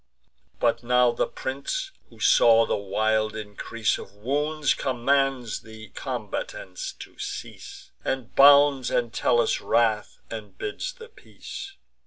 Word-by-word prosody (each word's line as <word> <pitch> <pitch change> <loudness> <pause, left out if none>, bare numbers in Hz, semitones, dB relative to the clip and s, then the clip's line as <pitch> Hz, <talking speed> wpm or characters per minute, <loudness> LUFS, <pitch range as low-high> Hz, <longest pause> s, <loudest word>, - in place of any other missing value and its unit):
But - - +2
now 125 0 +4
the 120 - -1
prince, - - -4 0.2
who - - -18
saw 115 -1 +6
the - - 0
wild 110 +2 0
increase 110 +1 -2
Of 100 - -11
wounds, 145 +7 0
commands 130 -1 0
the 110 -1 -12
combatants 90 -1 -5
to - - -13
cease, - - -8
And 130 -3 -3
bounds 140 -2 +7
Entellus' 120 0 +1
wrath, 110 -2 +1
and 110 -2 -8
bids 410 +5 -4
the 460 -2 -12
peace. 395 -2 -10
120 Hz, 120 wpm, -25 LUFS, 110-140 Hz, 0.2 s, bounds